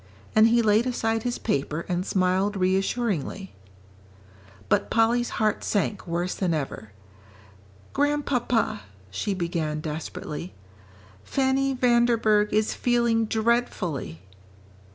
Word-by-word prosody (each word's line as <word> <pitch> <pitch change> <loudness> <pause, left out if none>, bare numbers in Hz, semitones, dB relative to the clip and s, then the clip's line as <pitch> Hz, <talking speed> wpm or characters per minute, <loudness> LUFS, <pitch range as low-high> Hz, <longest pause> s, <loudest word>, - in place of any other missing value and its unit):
and 215 +1 +7
he 235 0 +3
laid 220 +3 +3
aside 225 -2 0
his 245 +1 -2
paper 150 -3 -2
and 180 +1 -2
smiled 190 +2 +1
reassuringly. 190 - -1 1.1
But - - +1
Polly's 235 +1 +2
heart 215 -1 +1
sank 205 -1 -1
worse 175 +2 -1
than 175 -4 0
ever. 135 -8 -5 1.0
"Grandpapa," 260 -7 0 0.3
she 190 - -2
began 170 -4 -2
desperately, 155 +2 -6 0.7
"Fanny 270 - +1
Vanderburgh 235 -4 +3
is 215 0 +1
feeling 235 -2 +1
dreadfully." 215 - -1
210 Hz, 100 wpm, -25 LUFS, 180-235 Hz, 1.1 s, and